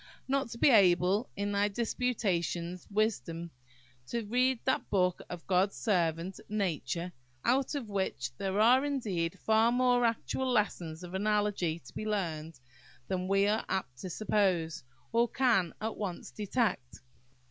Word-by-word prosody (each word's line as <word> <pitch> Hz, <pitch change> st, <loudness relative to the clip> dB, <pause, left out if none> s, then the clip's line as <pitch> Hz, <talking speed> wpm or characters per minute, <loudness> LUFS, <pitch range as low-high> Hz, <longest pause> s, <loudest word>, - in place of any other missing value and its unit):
not 275 Hz, -1 st, 0 dB
to 230 Hz, -, -7 dB
be 270 Hz, -, +5 dB
able, 190 Hz, +1 st, +4 dB
in 200 Hz, 0 st, -1 dB
thy 200 Hz, 0 st, +2 dB
disputatious 195 Hz, -6 st, -1 dB
wisdom, 170 Hz, -, -1 dB, 0.6 s
to 235 Hz, -2 st, -3 dB
read 250 Hz, +3 st, +2 dB
that 260 Hz, -, 0 dB
book 180 Hz, -3 st, +1 dB
of 175 Hz, -1 st, -7 dB
"God's 190 Hz, +1 st, +2 dB
servant, 175 Hz, -3 st, 0 dB
Nature," 175 Hz, -4 st, -2 dB, 0.3 s
out 270 Hz, +4 st, +2 dB
of 270 Hz, -6 st, -3 dB
which 190 Hz, -11 st, -2 dB
there 195 Hz, +1 st, -1 dB
are 245 Hz, +5 st, +6 dB
indeed 205 Hz, -13 st, -1 dB
far 220 Hz, +1 st, +3 dB
more 245 Hz, 0 st, +3 dB
actual 240 Hz, +3 st, 0 dB
lessons 180 Hz, -7 st, -1 dB
of 180 Hz, 0 st, -8 dB
analogy 205 Hz, -4 st, 0 dB
to -, -, -13 dB
be -, -, -5 dB
learned 165 Hz, -7 st, -3 dB, 0.5 s
than 185 Hz, -1 st, -1 dB
we 195 Hz, +1 st, +3 dB
are 215 Hz, +2 st, +1 dB
apt 125 Hz, -10 st, -3 dB
to 185 Hz, -, -5 dB
suppose, 175 Hz, -6 st, 0 dB, 0.3 s
or 235 Hz, +1 st, +3 dB
can 230 Hz, -9 st, +2 dB
at 220 Hz, +1 st, -3 dB
once 190 Hz, -5 st, -5 dB
detect. 210 Hz, -, -2 dB
200 Hz, 145 wpm, -31 LUFS, 175-230 Hz, 0.6 s, are